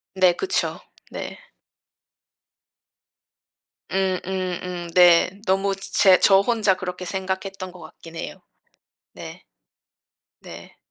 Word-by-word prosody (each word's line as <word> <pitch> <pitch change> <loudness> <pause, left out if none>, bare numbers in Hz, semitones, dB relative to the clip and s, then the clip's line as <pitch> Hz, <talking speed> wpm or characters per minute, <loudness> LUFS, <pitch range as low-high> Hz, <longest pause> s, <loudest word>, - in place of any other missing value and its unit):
네, 185 -2 +4
그쵸. 385 - -1 0.3
네. - - -7 2.5
음음음, 185 -2 -3
네. 180 +3 +5
너무 195 +1 +1
즈 195 - -10
제 190 -2 +5
저 195 -1 +6
혼자 215 -4 +1
그렇게 180 0 -6
생각했던 190 0 -4
것 180 - -14
같긴 165 0 -13
해요. - - -7 0.7
네. - - -10 1.0
네. - - -12
185 Hz, 160 characters per minute, -23 LUFS, 180-195 Hz, 2.5 s, 저